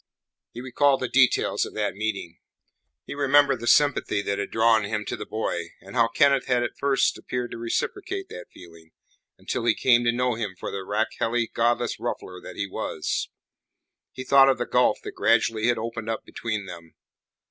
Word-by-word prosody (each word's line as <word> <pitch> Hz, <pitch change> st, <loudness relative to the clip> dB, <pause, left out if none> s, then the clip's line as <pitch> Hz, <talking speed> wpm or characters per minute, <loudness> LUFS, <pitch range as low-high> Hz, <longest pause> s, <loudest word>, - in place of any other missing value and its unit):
He 120 Hz, -, -8 dB
recalled 135 Hz, +2 st, +2 dB
the 130 Hz, -, -1 dB
details 130 Hz, -1 st, +2 dB
of -, -, -7 dB
that 105 Hz, -1 st, -1 dB
meeting; 100 Hz, -5 st, -4 dB, 0.7 s
he -, -, -6 dB
remembered 145 Hz, 0 st, +3 dB
the 120 Hz, -, -6 dB
sympathy 140 Hz, -8 st, +3 dB
that 100 Hz, 0 st, -2 dB
had 100 Hz, -, -3 dB
drawn 110 Hz, -1 st, +3 dB
him 105 Hz, +1 st, -3 dB
to -, -, -3 dB
the -, -, -8 dB
boy, 85 Hz, -6 st, -3 dB
and -, -, -13 dB
how 115 Hz, -2 st, +4 dB
Kenneth 140 Hz, +2 st, +2 dB
had 125 Hz, -1 st, +2 dB
at 120 Hz, -, -4 dB
first 140 Hz, -1 st, +1 dB
appeared 125 Hz, -1 st, -4 dB
to 115 Hz, -, -7 dB
reciprocate 390 Hz, -, -3 dB
that -, -, -9 dB
feeling, 85 Hz, -2 st, -16 dB, 0.4 s
until -, -, -4 dB
he -, -, +3 dB
came 120 Hz, -2 st, +3 dB
to 120 Hz, -, +4 dB
know 125 Hz, +1 st, 0 dB
him 105 Hz, -4 st, -4 dB
for -, -, -6 dB
the 95 Hz, -, -5 dB
rakehelly, 115 Hz, +3 st, -1 dB
godless 120 Hz, 0 st, 0 dB
ruffler 90 Hz, -1 st, -5 dB
that 90 Hz, -, -10 dB
he 100 Hz, -, -2 dB
was. 100 Hz, -, -3 dB, 0.8 s
He 130 Hz, -, -7 dB
thought 135 Hz, 0 st, +6 dB
of 135 Hz, -, +2 dB
the 120 Hz, -, -2 dB
gulf 125 Hz, 0 st, +2 dB
that -, -, -6 dB
gradually 110 Hz, 0 st, +2 dB
had 120 Hz, -1 st, +2 dB
opened 115 Hz, 0 st, -5 dB
up 110 Hz, -, -3 dB
between 110 Hz, -3 st, -4 dB
them. 85 Hz, -3 st, -11 dB
115 Hz, 190 wpm, -25 LUFS, 105-130 Hz, 0.8 s, thought